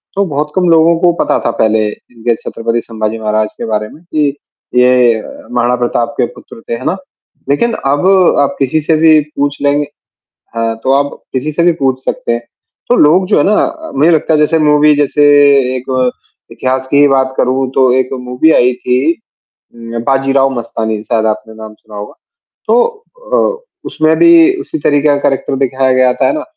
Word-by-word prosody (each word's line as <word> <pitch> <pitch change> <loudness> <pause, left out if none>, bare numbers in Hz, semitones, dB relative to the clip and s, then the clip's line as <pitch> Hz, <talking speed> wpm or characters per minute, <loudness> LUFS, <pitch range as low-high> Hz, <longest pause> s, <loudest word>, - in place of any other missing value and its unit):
तो 200 - +1
बहुत 150 -2 -3
कम 180 -2 +1
लोगों 165 0 +4
को 175 0 +3
पता - - 0
था - - +1
पहले 110 -1 +1
इनके 115 +1 -4
छत्रपति 115 +1 -3
संभाजी 110 -1 -4
महाराज 110 0 0
के - - -5
बारे 105 -1 -2
में 160 - -16
कि 155 -4 -1 0.5
ये 125 -3 +3 0.3
महाराणा 120 0 +1
प्रताप 120 +2 -2
के - - +2
पुत्र 115 - -14
थे, - - -2
है 115 - -6
ना? 185 - -1 0.5
लेकिन 230 +12 +1
अब 145 +7 +1 0.3
आप 140 - +1
किसी 140 +3 0
से 160 +1 +1
भी 160 -1 +5 0.2
पूछ 145 0 -1
लेंगे 145 +1 +1 0.7
हाँ 115 0 -1
तो 135 - +1
आप 140 +1 +1 0.2
किसी 140 +4 -2
से 170 +3 -1
भी 175 - +4
पूछ 130 -3 -2
सकते - - -2
हैं। 120 - -3 0.5
तो 245 - +4
लोग 170 +6 +4
जो 210 - +2
है 145 - +3
ना 210 - +2 0.4
मुझे 150 +5 +3
अ, - - +4
लगता 160 0 +1
है 150 - +2
जैसे 155 +2 +2
मूवी 150 0 +3
जैसे 145 0 +1 0.5
एक 130 0 -6 0.7
इतिहास 130 0 -3
की 145 +1 +4
बात 130 -1 +1
करूँ 130 +1 0
तो 130 -2 +3
एक 130 - -1
मूवी 125 +6 +1
आई 125 +1 +3
थी 125 +6 0 0.6
उ 115 0 -6
बाजीराव 135 0 +2
मस्तानी, 110 -2 -4
शायद 110 -1 -1
आपने 110 0 -3
नाम 110 -1 -10
सुना 105 -1 -16
होगा। 105 +7 -8 0.5
तो 485 - +3 0.5
अ, - - 0 0.2
उसमें 155 0 +1
भी 340 - +6 0.3
उसी 320 - -6
तरीके 145 0 +1
का 145 - +3
करैक्टर 135 0 -3
दिखाया 130 -1 0
गया 130 -1 +3
था, - - -1
है - - 0
ना? 305 - -4
135 Hz, 190 wpm, -12 LUFS, 120-150 Hz, 0.7 s, भी